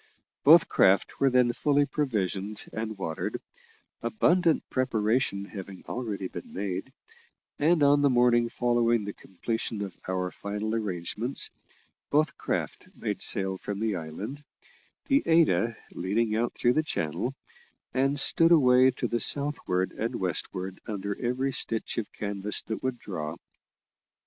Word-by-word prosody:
Both 165 +4 +7
craft 95 +1 +2
were 135 - +4
then 125 -1 +3
fully 145 +2 +2
provisioned 105 -8 -2
and 110 -1 -4
watered, 80 -4 -4 0.6
abundant 165 - +2
preparation 110 -4 0
having 100 -2 -9
already 105 -6 -4
been 85 - -9
made, 95 +5 -4 0.7
and 155 +1 +3
on 145 0 +5
the 140 - +4
morning 120 -1 +3
following 120 -2 +1
the 100 0 -5
completion 110 +3 -4
of 95 -3 -7
our 90 -1 -2
final 105 +2 -4
arrangements, 105 +4 -1 0.6
both 155 +1 +2
craft - - -3
made - - -4
sail 95 -1 +4
from 100 -1 -5
the 110 -2 -1
island, 95 - -6 0.6
the 275 0 +3
Ada 160 -9 +3 0.2
leading 105 +4 -1
out 120 +2 -1
through 120 - +2
the 155 - +2
channel, 125 - -3 0.6
and 135 +2 +2
stood 165 +4 +6
away 130 -5 +6
to 125 -1 -2
the 120 0 -1
southward 140 -12 +2
and - - -3
westward 95 +1 -3
under 100 -1 -3
every 130 +3 0
stitch 115 -3 -1
of 110 - -6
canvas 100 0 -3
that 110 - -5
would 130 -1 -2
draw. 80 -8 -5
115 Hz, 135 wpm, -27 LUFS, 100-130 Hz, 0.7 s, Both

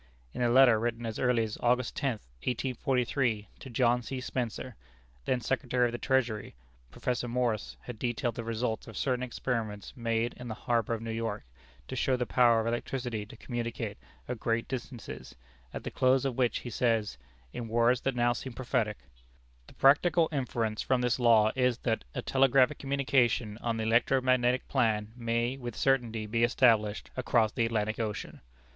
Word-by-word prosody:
In - - -4
a 120 - +3
letter 120 -2 +6
written 115 0 -2
as 110 -1 -4
early 125 -2 +2
as 110 -1 -5
August 125 0 +1
tenth, 130 -7 -2 0.2
1843, 125 - 0
to 130 - -9
John 120 0 +2
C. 130 +2 -5
Spencer, 125 -1 -4 0.5
then 125 -1 0
Secretary 125 0 +1
of 120 - 0
the 120 - -5
Treasury, 120 - 0 0.3
Professor 125 - -2
Morse 120 -3 -1
had 120 -3 -8
detailed 120 0 -1
the 115 - -5
results 115 0 -2
of 115 - -9
certain 125 -2 0
experiments 115 -5 -3
made 115 -1 -1
in 125 - -8
the 110 - -4
harbor 115 -1 0
of 115 - -7
New 115 - -4
York 115 -2 -3 0.4
to 130 - -5
show 130 +1 +1
the 125 - -1
power 120 -2 +4
of 110 - -1
electricity 120 -2 -3
to - - -12
communicate 115 -3 -4 0.3
at 125 -2 -4
great 115 +1 0
distances, 125 -2 -7 0.4
at - - -6
the - - -5
close 130 +1 +3
of 135 - 0
which 125 -2 +1
he 120 - -7
says 110 - 0 0.3
in 115 - -5
words 120 +2 +3
that 135 -1 -1
now 120 0 +3
seem 130 +1 -6
prophetic: 120 -4 -1 0.7
"The - - -16
practical 160 +4 +4
inference 115 -6 -1
from 130 -1 +1
this 125 +1 +1
law 110 -3 +5
is, 125 -2 +2
that 110 - 0
a - - -3
telegraphic 135 +1 +3
communication 130 -5 +1
on 115 -1 -2
the 110 - -2
electro 115 +4 +3
magnetic 130 -1 +2
plan 110 -5 +1
may 120 +2 -1
with 120 -4 -6
certainty 120 -5 +1
be 115 +2 0
established 115 -4 +3
across 120 -4 +2
the 115 - +1
Atlantic 110 -1 -1
Ocean! 110 -2 -4
120 Hz, 175 wpm, -30 LUFS, 115-125 Hz, 0.7 s, letter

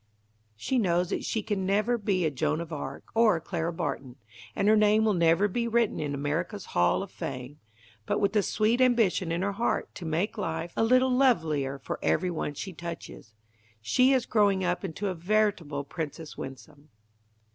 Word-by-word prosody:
She 250 - -1
knows 175 -4 +1
that - - -2
she 220 - -1
can 205 -3 -2
never 210 +5 +1
be 195 -5 0
a 155 - +1
Joan 145 +3 -1
of 170 -1 -6
Arc 140 -2 -6
or 225 -3 +4
a - - -2
Clara 165 +1 -3
Barton, 140 -7 -4 0.4
and 200 - +1
her 215 - +6
name 215 +1 +4
will 215 - +3
never 170 +3 +3
be 235 +4 -2
written 235 -1 +1
in 145 -2 -2
America's 160 +8 -3
hall 90 - +2
of 195 - -10
fame, 130 +2 -6 0.5
but - - +1
with 200 -1 +1
the 210 - +4
sweet 225 +5 +1
ambition 225 -8 +3
in 170 +2 -1
her 200 - 0
heart 230 +4 -1
to 175 - -8
make 185 +8 -1
life 165 -2 -3
a - - +2
little 255 +3 +4
lovelier 160 - +2
for 135 - -6
every 180 -1 +1
one 155 -3 -3
she 190 +5 -6
touches, 165 -10 -8 0.4
she 250 - +3
is 260 -3 +2
growing 200 -3 +2
up 180 +1 -1
into 195 +2 -3
a 190 - -1
veritable 175 -5 0
Princess 155 +1 -6
Winsome. 140 +3 -10
180 Hz, 190 wpm, -28 LUFS, 155-215 Hz, 0.5 s, her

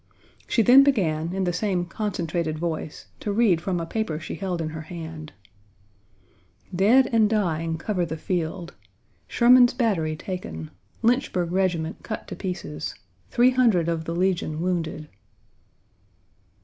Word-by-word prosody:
She 230 - +2
then 255 +5 +8
began, 170 - +1
in 190 +1 -1
the 175 -1 0
same 180 -2 -1
concentrated 170 -5 -3
voice, 160 -2 -4
to 210 - -3
read 200 -6 +3
from 180 0 -1
a 165 - -3
paper 165 -4 -3
she 160 - -7
held 185 -3 -3
in 160 -1 -2
her 155 0 -6
hand: 160 -1 -8 1.4
"Dead 230 +8 +5
and 220 -2 +4
dying 165 -6 0
cover 180 +2 -1
the 160 -1 -4
field. 170 +1 -3 0.5
Sherman's 245 0 +5
battery 190 -11 0
taken. 80 - -6 0.3
Lynchburg 225 -8 +1
regiment 175 -4 -1
cut 215 - -6
to - - -5
pieces. 180 -5 -5 0.3
Three 250 +1 +4
hundred 230 -10 +3
of 165 -1 -2
the 165 - -3
Legion 175 -4 0
wounded." 165 -3 -2
175 Hz, 135 wpm, -24 LUFS, 160-210 Hz, 1.4 s, then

